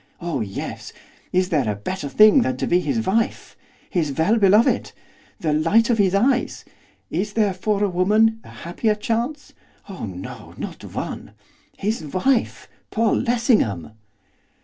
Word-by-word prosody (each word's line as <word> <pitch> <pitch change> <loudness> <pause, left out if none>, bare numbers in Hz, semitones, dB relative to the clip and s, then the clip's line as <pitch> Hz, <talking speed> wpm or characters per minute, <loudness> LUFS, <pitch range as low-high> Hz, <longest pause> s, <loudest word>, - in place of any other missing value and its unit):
oh 170 -7 -3
yes! 100 -3 -6 0.4
Is 185 0 +1
there 140 -9 +1
a - - -3
better 145 - -5
thing 215 - +6
than 255 +1 -1
to - - -1
be 175 - +3
his 225 +4 -1
wife? 225 +4 -1 0.3
his 165 -7 -1
well 175 +10 +2
beloved? 210 +2 +3 0.5
the 155 -3 0
light 225 +10 +3
of 225 - +1
his 195 -1 +3
eyes? 250 +5 +1 0.5
Is 200 +6 -2
there 210 -3 +2
for 205 +2 -1
a - - +3
woman 210 +5 +2
a - - -14
happier 210 +6 -2
chance? 235 +7 -3 0.3
Oh 190 - -6
no, 95 -1 -9
not - - -7
one! - - -6 0.4
His 215 +1 -2
wife! 225 - 0 0.2
Paul 225 -1 +1
Lessingham! 220 - +1
205 Hz, 150 wpm, -22 LUFS, 170-225 Hz, 0.5 s, thing